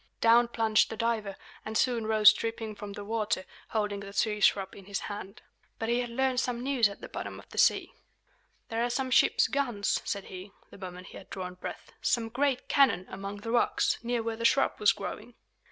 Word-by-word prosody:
Down 235 +1 +5
plunged 225 -2 +2
the 225 - -6
diver, 220 -3 -1 0.3
and 220 0 -3
soon 235 -4 +1
rose 215 -1 +7
dripping 225 -1 -4
from 205 -1 -8
the 205 0 -7
water, 210 -3 -1 0.2
holding 210 -2 -1
the 200 0 -9
sea 210 +1 0
shrub 195 -1 +2
in 195 - -12
his 200 0 -3
hand. 205 +1 -7 0.3
But 225 - -3
he 240 +1 +2
had 245 -1 -2
learned 260 +1 +1
some 245 -1 -2
news 255 -5 +3
at 200 - -11
the - - -7
bottom - - -6
of - - -13
the - - -4
sea. - - +3 0.8
"There 230 0 -1
are 240 - 0
some 255 +1 -2
ship's - - +4
guns," 245 -8 0
said 200 -1 -3
he, 190 +2 -10 0.2
the - - -13
moment 180 -1 -8
he - - -10
had - - -13
drawn 180 -1 -5
breath, 180 - -8
"some 230 -2 +1
great 265 +2 0
cannon, 265 -10 +3
among 200 +1 -6
the 225 - -4
rocks, 240 - +2
near 235 0 -1
where 225 0 -2
the 230 - -6
shrub 275 +4 +4
was 210 - +5
growing." 215 +4 -7
220 Hz, 210 wpm, -29 LUFS, 200-240 Hz, 0.8 s, rose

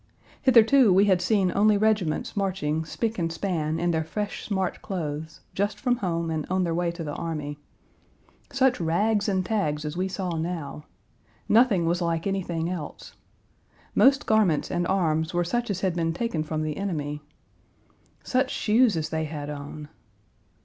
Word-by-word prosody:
Hitherto 245 -1 +6
we 195 +2 +5
had 190 -3 +3
seen 190 -1 +2
only 210 +1 +4
regiments 210 -6 0
marching 180 -6 -1
spick 225 +5 -3
and 165 -1 -1
span 165 -3 -2
in 175 +1 +1
their 160 -1 0
fresh, 205 +6 -4
smart 190 -3 -2
clothes, 160 -4 -5
just 205 +1 -1
from 245 -2 +1
home 170 -6 -2
and 155 -1 -1
on 185 0 +1
their 170 -2 0
way 175 +1 0
to 170 0 -5
the 145 -2 -4
army. 150 -3 -4 0.9
Such 265 -5 +2
rags 205 +6 +1
and 190 -2 0
tags 155 -8 -1
as 150 +1 -4
we 185 +2 0
saw 185 -2 -3
now. 160 -3 -4 0.6
Nothing 215 -6 +4
was 175 +2 0
like 165 -1 -1
anything 175 -4 -1
else. 175 -4 -6 0.8
Most 275 +2 +4
garments 210 -8 +2
and 175 0 0
arms 160 -3 0
were 175 - +2
such 240 +6 -2
as 190 -2 -2
had 185 -3 0
been 165 -1 0
taken 175 -4 -2
from 155 0 -2
the 155 -1 -3
enemy. 150 -7 -3 1.0
Such 260 +1 +1
shoes 220 -4 +3
as 160 0 -2
they 160 0 -1
had 150 -1 -5
on. 145 +1 -7
175 Hz, 165 wpm, -26 LUFS, 160-205 Hz, 1.0 s, Hitherto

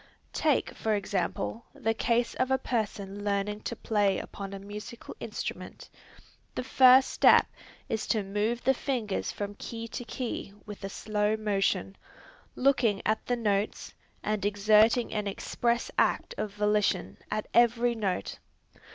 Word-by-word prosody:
Take 300 -4 +1
for 220 -1 0
example, 200 +3 -2
the 225 - 0
case 235 +1 +1
of 255 - 0
a 265 - +3
person 205 -5 -3
learning 205 0 -1
to - - -5
play 205 -3 +1
upon 195 -1 -7
a 195 - -5
musical 210 +4 -9
instrument. - - -6 0.6
The - - -2
first 260 0 +6
step - - +6 0.4
is 220 - -2
to 215 -2 +1
move 210 +5 -1
the 265 +1 +4
fingers 245 -7 -2
from 205 0 -5
key 230 0 -6
to 245 - -5
key 235 -4 -5
with 210 -2 -9
a 195 - -3
slow 210 +1 0
motion, 195 -2 0 0.6
looking 245 -7 +2
at 220 +1 +1
the 245 - +2
notes, 210 -3 -1 0.3
and 215 -1 -1
exerting 215 +4 +4
an 210 -1 -1
express 235 +4 -1
act - - +1
of 210 - -3
volition 210 -2 0
at 215 0 -2
every 240 0 +4
note. 200 -5 -2
215 Hz, 145 wpm, -29 LUFS, 205-235 Hz, 0.6 s, first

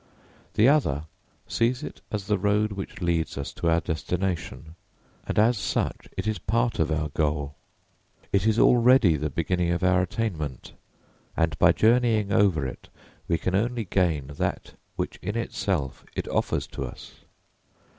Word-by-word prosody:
The 110 - +5
other 105 - +2 0.4
sees 125 +4 0
it - - -8
as 105 -3 -3
the 105 -1 +1
road 105 +2 +1
which 95 -1 -7
leads 85 -4 0
us 70 - -5
to 85 - -1
our 85 0 +3
destination; 85 +1 -3 0.5
and - - -3
as 110 +1 +4
such - - -2
it - - -2
is 110 0 -1
part 115 +1 0
of 80 -1 +1
our 80 -1 -1
goal. 75 -1 -1 0.8
It 100 +2 +2
is 110 0 +3
already 120 -7 +5
the 75 +1 -2
beginning 85 +4 0
of 85 +1 -1
our 90 0 +4
attainment, 90 - -3 0.6
and 80 -3 +1
by 90 - +6
journeying 110 -3 +3
over 90 -9 +3
it 65 - -7 0.4
we 85 - +2
can 90 - -2
only 115 +3 0
gain 85 -7 +1
that - - -2 0.2
which - - -3
in 105 +4 -3
itself 90 - -2
it - - -3
offers - - 0
to - - -6
us. 65 - -10
95 Hz, 155 wpm, -26 LUFS, 80-110 Hz, 0.8 s, by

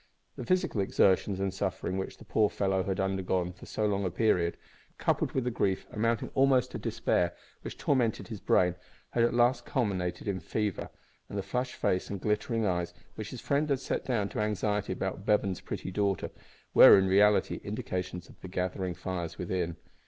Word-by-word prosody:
The - - -7
physical 185 - +1
exertions 95 0 +2
and 95 -1 -1
sufferings 95 -1 -2
which 95 - -5
the - - -14
poor 105 -2 +2
fellow 95 -2 0
had 95 +1 -2
undergone 95 -2 0
for - - -13
so 110 - -1
long 100 -1 +1
a 95 - 0
period, 90 -3 +1 0.4
coupled - - 0
with 130 - 0
the 125 - -1
grief, 95 -4 0
amounting 115 +1 0
almost 135 -2 +3
to - - -5
despair, 85 0 0 0.3
which - - -7
tormented 125 -6 +1
his 110 -3 -6
brain, 90 -1 +3 0.4
had 120 - +2
at 120 0 +2
last 120 +2 +3
culminated 95 -7 -2
in 95 -2 -1
fever; 105 +3 -2 0.4
and 100 - -5
the 100 - -1
flushed 125 +6 -2
face 90 - 0
and 100 - -4
glittering 110 +3 0
eyes, 90 -2 -1 0.2
which 110 -2 -6
his 125 - -7
friend 145 +2 +1
had 140 -2 +2
set - - -2
down 115 -6 0
to - - -5
anxiety 105 -1 0
about 95 +1 -3
Bevan's 100 -3 +1
pretty 95 - -5
daughter, 100 -1 0 0.4
were, - - +10
in 95 - +3
reality, 100 +2 +3
indications 90 -1 -4
of - - -18
the - - -7
gathering 90 0 -2
fires 90 -2 -4
within. 85 -2 -2
100 Hz, 185 wpm, -30 LUFS, 95-110 Hz, 0.4 s, were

